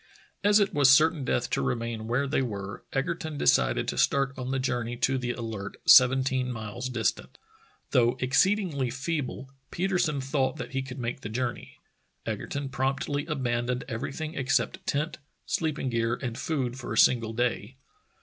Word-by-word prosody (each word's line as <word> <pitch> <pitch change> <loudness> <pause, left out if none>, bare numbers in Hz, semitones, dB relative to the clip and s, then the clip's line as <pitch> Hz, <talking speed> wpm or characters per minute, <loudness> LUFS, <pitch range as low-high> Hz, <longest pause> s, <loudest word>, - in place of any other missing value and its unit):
As 205 +1 +5
it 200 -1 +1
was 145 -2 +5
certain 155 +2 +5
death 125 -1 0
to - - +1
remain 115 -2 -2
where 125 +4 +1
they 135 - +1
were, 100 -5 -5
Egerton 155 +2 -2
decided - - +2
to - - -2
start 140 -1 +2
on 130 -1 -5
the 135 - 0
journey 120 -2 -2
to 130 +1 +1
the 125 -1 -3
Alert, 110 -5 -6
seventeen 130 0 +5
miles 115 +2 -5
distant. 115 -5 -2 0.5
Though 120 -1 +3
exceedingly 145 - +2
feeble, 135 0 -4 0.2
Petersen 175 -5 0
thought 135 0 0
that 125 - -6
he 135 0 -1
could 130 0 -8
make 125 +1 -4
the 105 - -6
journey. 120 +2 -4 0.5
Egerton 140 -1 -4
promptly 135 +3 -1
abandoned 125 -4 -1
everything 140 +6 -4
except 135 -5 0
tent, 150 +4 -1 0.3
sleeping 155 -5 -1
gear, 115 0 0
and 125 -3 -5
food 130 -4 -2
for 125 - -6
a - - -2
single 115 -3 +4
day. 120 0 -1
130 Hz, 160 wpm, -27 LUFS, 120-140 Hz, 0.5 s, As